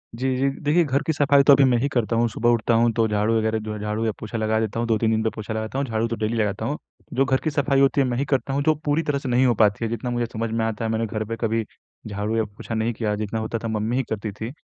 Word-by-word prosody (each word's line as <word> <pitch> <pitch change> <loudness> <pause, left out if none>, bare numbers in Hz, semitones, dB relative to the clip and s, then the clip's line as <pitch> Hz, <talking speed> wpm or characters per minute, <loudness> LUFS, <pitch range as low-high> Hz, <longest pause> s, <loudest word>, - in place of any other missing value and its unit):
जी, 130 +2 -1
जी। 135 +1 +2
देखिए 155 +4 +3
घर 140 -2 0
की 160 - +2
सफाई 140 -1 +4
तो 140 - +7
अभी 140 0 +5
मैं 120 - +3
ही 135 +4 +1
करता 120 -4 0
हूँ, 120 +1 +3
सुबह 120 +2 0
उठता 115 0 +2
हूँ 115 +1 +4
तो 115 -1 +2
झाड़ू 105 +2 +1
वगैरह 110 0 0
जो 110 0 -5
है, 105 - -6
झाड़ू 105 +2 -2
या 110 - +1
पोछा 110 +1 -5
लगा 110 0 +1
देता 110 0 -2
हूँ 120 - -1
2-3 110 0 +2
दिन 110 0 +1
पे 110 - +1
पोछा 110 0 -5
लगाता 110 +3 -4
हूँ, 140 - 0
झाड़ू 115 0 0
तो 115 - -3
डेली 110 +1 -2
लगाता 105 0 -1
हूँ। 145 +5 -2 0.4
जो 135 +2 +2
घर 130 0 +2
की 155 - +1
सफाई 140 -1 +1
होती 135 +1 +4
है 135 - +2
मैं 120 -1 -1
ही 140 - 0
करता 135 -1 -1
हूँ, 140 - +1
जो 155 +1 +3
पूरी 150 +2 +1
तरह 145 -3 0
से 135 - -5
नहीं 125 +2 +3
हो 125 - +4
पाती 105 +1 +2
है, - - -2
जितना 120 +2 -3
मुझे 120 -1 0
समझ 115 0 -2
में 115 0 0
आता 110 0 -2
है 110 - -1
मैंने 115 0 0
घर 110 0 -3
पे 115 +2 -4
कभी 115 -1 0 0.4
झाड़ू 105 +1 -2
या 110 - +2
पोछा 105 +2 -7
नहीं 110 +1 0
किया, 105 -2 -1
जितना 110 +1 -3
होता 110 +1 -2
था 115 - -2
मम्मी 110 +2 -1
ही 135 - +1
करती 105 -1 -3
थी। 110 +4 -6
115 Hz, 315 wpm, -23 LUFS, 110-130 Hz, 0.4 s, तो